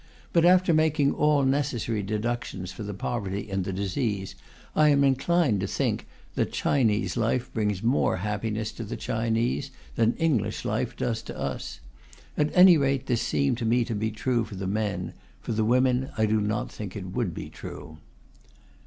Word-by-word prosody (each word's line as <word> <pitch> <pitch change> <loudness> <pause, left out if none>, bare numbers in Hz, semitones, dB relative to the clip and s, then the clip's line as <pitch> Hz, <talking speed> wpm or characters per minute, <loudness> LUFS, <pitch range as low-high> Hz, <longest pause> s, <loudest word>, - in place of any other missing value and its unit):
But 170 -1 +4
after 180 -1 +5
making 155 -2 +3
all 150 -2 +3
necessary 130 -5 0
deductions 105 -2 -3
for - - -9
the 105 -1 -4
poverty 100 -1 -3
and 95 -1 0
the 95 - -3
disease, 100 +1 -2 0.4
I 155 -1 +5
am 140 -1 +4
inclined 135 - +2
to 95 - -1
think - - -1 0.3
that - - -1
Chinese 115 -6 +1
life 120 +2 0
brings 105 -3 -1
more 120 -4 +2
happiness 105 +2 -2
to 115 - -7
the 105 - -5
Chinese 115 +4 -1 0.2
than 115 +1 +2
English 155 -10 0
life - - -1
does 115 -2 -1
to - - -8
us. 60 - -4 0.5
At 150 0 +1
any 180 -2 +9
rate 135 -2 +1
this 120 -2 0
seemed 70 - 0
to 115 - -2
me 120 +1 +2
to 115 - -3
be 110 +1 -1
true 115 +2 0
for 105 - -8
the 95 +1 -4
men; 105 +1 -2 0.3
for - - -6
the 110 0 +1
women 125 +3 +2
I 110 - +3
do 110 0 +2
not 105 +1 -2
think 100 -4 -7
it 95 -3 -6
would - - -1
be - - -6
true. 80 0 -9
115 Hz, 180 wpm, -26 LUFS, 105-135 Hz, 0.5 s, any